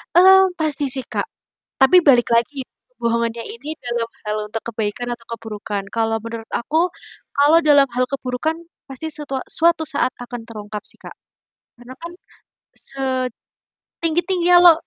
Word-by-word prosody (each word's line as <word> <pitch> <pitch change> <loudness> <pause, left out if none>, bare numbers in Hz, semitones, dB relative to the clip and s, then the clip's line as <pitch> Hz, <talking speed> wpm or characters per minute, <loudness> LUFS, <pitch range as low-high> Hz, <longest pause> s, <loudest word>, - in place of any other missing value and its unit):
Mmm, 380 +1 +7
pasti 300 -2 +1
sih, 265 - 0
Kak. - - -2 0.5
Tapi 280 +7 +6
balik 245 -7 +4
lagi, 255 +3 +1
ya - - -59 0.3
kebohongannya 235 0 -1
ini 295 +7 -7
dalam 235 -3 -3 0.2
hal 210 0 -2
untuk 225 +1 -4
kebaikan 225 +3 -3
atau 235 -1 -8
keburukan. 210 -3 -5
Kalau 225 -1 0
menurut 230 -1 -7
aku, 320 +8 0 0.5
kalau 295 +4 +6
dalam 290 -3 +6
hal 250 +1 +1
keburukan 275 +4 -2 0.3
pasti 300 +4 -5
setua 280 -3 -4
suatu 330 -1 +2
saat 285 -4 +1
akan 245 -1 -7
terungkap 210 -1 -7
sih - - -3
Kak. - - -11 0.7
Karena 245 +1 -11
kan 340 0 -7 1.7
setinggi-tingginya 350 +2 +2
lo 350 -2 +9
260 Hz, 140 wpm, -20 LUFS, 230-315 Hz, 1.7 s, lo